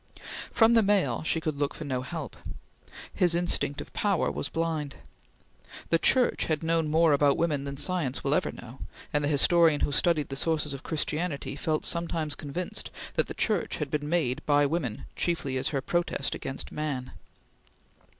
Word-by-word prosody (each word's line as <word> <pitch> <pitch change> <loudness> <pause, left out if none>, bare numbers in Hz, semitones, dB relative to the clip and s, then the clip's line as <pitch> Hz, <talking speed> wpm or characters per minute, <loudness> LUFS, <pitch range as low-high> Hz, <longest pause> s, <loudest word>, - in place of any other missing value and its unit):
From 225 0 +5
the 230 - +6
male, 205 -2 +2
she 160 +1 0
could 155 -2 -2
look 145 -1 0
for - - -6
no 130 -4 -2
help; 130 - -6 0.8
his 175 -2 +3
instinct 170 -4 0
of - - -11
power 200 -5 +1
was 145 - -3
blind. 160 -4 -2 1.0
The 165 - +4
Church 250 +7 +3
had 155 -1 -1
known 165 -1 +1
more 160 0 +4
about 140 0 +4
women 150 -4 0
than 140 0 -5
science 155 -5 -1
will 140 - +1
ever 185 - +1
know, 125 +3 -11 0.3
and 145 0 +2
the - - +1
historian 155 +1 +4
who - - +1
studied 155 +1 +2
the 135 - -4
sources 150 0 0
of 140 - -6
Christianity 150 -3 -2
felt 155 +2 -1
sometimes 165 -3 -1
convinced 165 +6 -4 0.2
that - - +1
the - - -6
Church 210 -6 0
had 150 -3 -4
been 150 -1 -2
made 155 -7 0
by 145 -1 +5
the 140 - +2
woman 150 -9 -2
chiefly 165 -6 -1
as 130 +1 0
her 140 -3 -1
protest 170 -2 -1
against 135 - -5
man. 140 -4 -3
155 Hz, 180 wpm, -28 LUFS, 140-170 Hz, 1.0 s, the